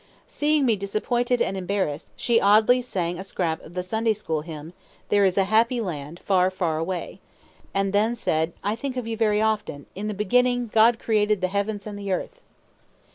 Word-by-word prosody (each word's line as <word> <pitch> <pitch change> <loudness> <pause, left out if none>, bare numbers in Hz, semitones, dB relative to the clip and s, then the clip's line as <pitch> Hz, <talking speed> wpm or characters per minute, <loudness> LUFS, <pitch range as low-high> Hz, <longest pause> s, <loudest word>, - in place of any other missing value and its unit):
Seeing 295 -1 +1
me 230 -3 +3
disappointed 240 +5 0
and 195 - -2
embarrassed, 185 -5 -2
she 235 -1 +2
oddly 215 +5 +5
sang 180 -7 -3
a - - -5
scrap 170 -4 -2
of 170 - -14
the 180 - -2
Sunday 220 +4 0
school 160 -7 -3
hymn, 160 +1 -9 0.4
"There 205 -1 +4
is 185 0 +1
a 195 - +5
Happy 225 +5 +2
Land, 165 -5 -5
far, 185 -2 +3
far 175 -4 -1
away"; 175 +2 -4 0.5
and 195 0 0
then 220 +4 +2
said, 160 -6 0
"I 205 +2 0
think 260 +2 -5
of 250 - -3
you 225 0 -3
very 215 -2 +2
often. 210 -10 -1
In 205 +3 -5
the 210 - -3
beginning, 245 +2 +1
God 225 +1 +5
created 210 -2 +1
the 185 0 0
heavens 200 +1 -2
and 205 -1 -6
the 200 -1 -4
earth." 485 - -3
205 Hz, 190 wpm, -24 LUFS, 180-225 Hz, 0.5 s, oddly